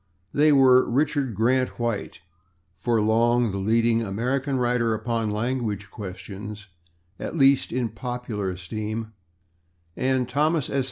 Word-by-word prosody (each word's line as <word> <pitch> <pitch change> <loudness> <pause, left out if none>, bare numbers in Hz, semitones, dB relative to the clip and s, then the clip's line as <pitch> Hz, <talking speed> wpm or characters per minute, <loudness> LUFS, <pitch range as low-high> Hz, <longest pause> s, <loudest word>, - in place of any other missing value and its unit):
They 150 +1 +4
were 130 -2 +5
Richard 140 -2 0
Grant 125 +5 +1
White, 115 -7 -3 0.5
for 110 +6 0
long 115 +2 +2
the 100 - -3
leading 115 +3 +2
American 125 +6 -1
writer 120 -2 +1
upon 115 0 -2
language 105 -2 -2
questions, 100 +1 -8 0.5
at - - -5
least 135 -1 +4
in 120 -1 -1
popular 120 -3 -4
esteem, 110 +5 -5 0.8
and 130 -1 0
Thomas 150 +2 0
S. 140 - +1
115 Hz, 120 wpm, -25 LUFS, 105-130 Hz, 0.8 s, were